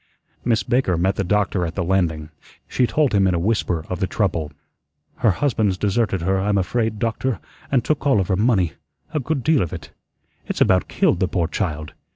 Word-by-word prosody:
Miss 115 -2 +1
Baker 120 -8 +1
met 95 +3 +1
the - - -1
doctor 100 -1 +1
at 85 0 -4
the 95 - -1
landing, 85 -4 0 0.4
she 125 - +1
told 150 -4 +1
him 100 -1 +4
in 90 - +2
a - - 0
whisper 90 -4 0
of 90 - -4
the 95 - 0
trouble. 85 -8 -1 0.7
"Her 115 - +3
husband's 105 -4 +1
deserted 100 -2 0
her, 95 +2 +1
I'm 100 +1 +1
afraid, 110 +3 0
doctor, 115 +2 -1 0.3
and 130 -4 +2
took 150 -2 0
all 135 -7 +4
of 95 - 0
her 95 - +3
money 100 -5 +2 0.4
a 155 - +1
good 140 -1 -2
deal 155 -5 +3
of 85 - -3
it. - - -8 0.6
It's - - -3
about 95 -3 +3
killed - - +1
the - - +2
poor 85 -2 0
child. 80 -5 -3
100 Hz, 200 wpm, -21 LUFS, 90-115 Hz, 0.7 s, him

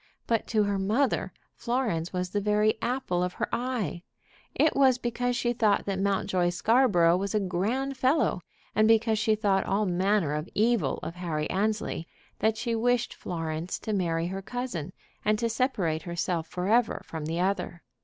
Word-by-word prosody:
But 230 -2 0
to 215 -2 +2
her 200 -1 0
mother 195 - +1 0.2
Florence 235 -9 -1
was 180 -1 -3
the 205 - 0
very 210 +1 +3
apple 240 -8 -1
of 180 0 -1
her - - -2
eye. 235 - -2 0.5
It 310 - +3
was 265 -3 +5
because 245 0 -1
she 240 0 0
thought 215 -3 +2
that 195 -1 -2
Mountjoy 190 -2 +1
Scarborough 175 -3 +4
was 200 +2 -2
a - - +4
grand 220 +9 -1
fellow, 260 - +2 0.3
and 215 +1 +4
because 225 -1 +3
she 220 0 +2
thought 200 -3 +1
all 205 +2 +1
manner 185 -3 +1
of 150 +4 -3
evil 215 - +2
of - - -4
Harry 165 -4 -3
Annesley, 205 -3 -1 0.3
that 220 0 +1
she 235 +1 -2
wished 240 +1 +1
Florence 165 0 -4
to 215 - -4
marry 170 -4 0
her 190 +2 -4
cousin, 240 - -4 0.3
and 215 0 +2
to 230 - 0
separate 215 - 0
herself 170 0 -2
forever 215 +8 +1
from 160 -2 -6
the 165 +2 -2
other. 185 -2 -1
205 Hz, 170 wpm, -28 LUFS, 175-235 Hz, 0.5 s, was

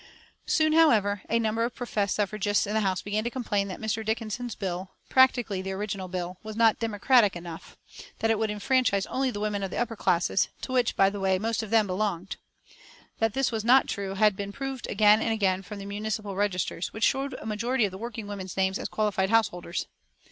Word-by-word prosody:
Soon, 310 -1 +3
however, 215 - +4
a 230 - +3
number 225 0 0
of 235 +1 -2
professed 210 -5 -1
suffragists 205 0 0
in 205 - -3
the 220 - +2
House 190 -4 0
began 210 +1 -1
to 240 - -1
complain 210 -6 -1
that 185 - -6
Mr. 220 0 -2
Dickinson's 225 +1 -3
bill, 185 -1 -4 0.2
practically 245 -7 +3
the 190 0 -4
original 195 -1 -4
bill, 180 0 -5
was 215 0 -7
not 225 -1 +4
"democratic" 225 -1 +3
enough, 170 -1 -9 0.4
that 225 - +1
it 220 - +1
would 220 -1 0
enfranchise 210 -1 +1
only 265 0 -1
the 205 - -5
women 210 -1 -1
of 195 - -2
the - - -5
upper 235 -1 -1
classes 175 -1 +1
to - - -6
which, 250 -2 +1
by 195 0 +4
the 205 - -5
way, 190 -1 +2
most 225 +3 -1
of 220 - -6
them 220 -1 +4
belonged. 190 -1 -2 0.8
That 225 -1 +1
this 270 -2 +1
was 220 -2 -2
not 255 +4 +5
true 195 -1 -4
had 210 0 +4
been 200 0 -5
proved 270 +2 -5
again 210 +1 +5
and - - 0
again 190 -3 +1
from 205 +2 -9
the 200 - -7
municipal 205 0 -4
registers, 185 -3 -1
which 220 - -5
showed 270 0 +1
a - - -9
majority 225 +3 0
of 195 - -4
working 220 +2 -6
women's 195 -3 -7
names 190 +1 +1
as - - -3
qualified 200 -3 0
householders. 185 -6 0
210 Hz, 210 wpm, -27 LUFS, 195-225 Hz, 0.8 s, not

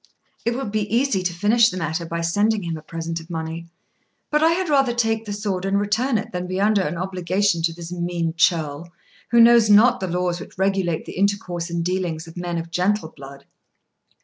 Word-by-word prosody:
It 235 +1 0
would 255 -5 -4
be 210 -1 -2
easy 235 -4 +2
to 180 -1 -1
finish 215 +7 +3
the 185 - -6
matter 165 0 -3
by 170 0 -3
sending 200 0 0
a 155 - -8
present 165 +1 -5
of 165 +1 -14
money; 165 0 -5 0.6
but 300 0 +2
I 320 - +5
had 360 +2 0
rather 270 -5 +2
take 225 -1 0
the 210 - -5
sword 200 -3 -3
and 195 +1 +1
return 220 +5 +1
it 210 - -5
than 180 0 -4
be 185 +1 -3
under 205 0 +3
an 170 -1 -3
obligation 185 0 0
to 165 0 +1
this 170 +1 -9
mean 170 -2 -2
churl, 165 -2 0 0.4
who 235 +2 +4
knows 230 -1 +7
not 240 +4 +6
the 190 - -3
laws 180 0 -1
which - - -11
regulate 190 -4 0
the - - -7
intercourse 185 -3 -1
and 170 0 -2
dealings 180 -3 -2
of 165 - -13
men 175 -1 -3
of 165 0 -5
gentle 185 0 0
blood." 140 -1 -12
185 Hz, 205 wpm, -22 LUFS, 170-210 Hz, 0.6 s, knows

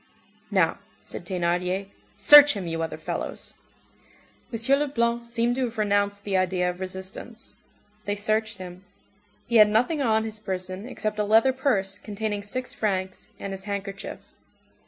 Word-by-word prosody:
"Now," - - +2 0.2
said - - -8
Thénardier, 180 +1 -1 0.3
"search 295 0 +9
him, 195 -3 -4
you 165 -1 -3
other 165 - -3
fellows!" - - -5 1.0
M. 235 +4 +3
Leblanc 235 -4 0
seemed 235 +1 0
to 260 - +1
have 230 -1 -7
renounced 205 -1 +1
the 200 -2 -2
idea 185 -1 +1
of 180 - -13
resistance. 190 +5 -7 0.5
They 205 - -1
searched 215 +1 0
him. 185 0 -9 0.6
He 235 -1 +2
had 210 -1 +8
nothing 250 +8 +2
on 220 -4 +2
his 220 -1 -5
person 185 0 -4
except 215 -3 -3
a - - +2
leather 225 +5 +4
purse 200 -8 0
containing 210 -1 -3
six 250 +5 -3
francs, 190 -3 -2
and 195 - -5
his 195 0 -8
handkerchief. 200 -1 -5
205 Hz, 150 wpm, -25 LUFS, 190-230 Hz, 1.0 s, search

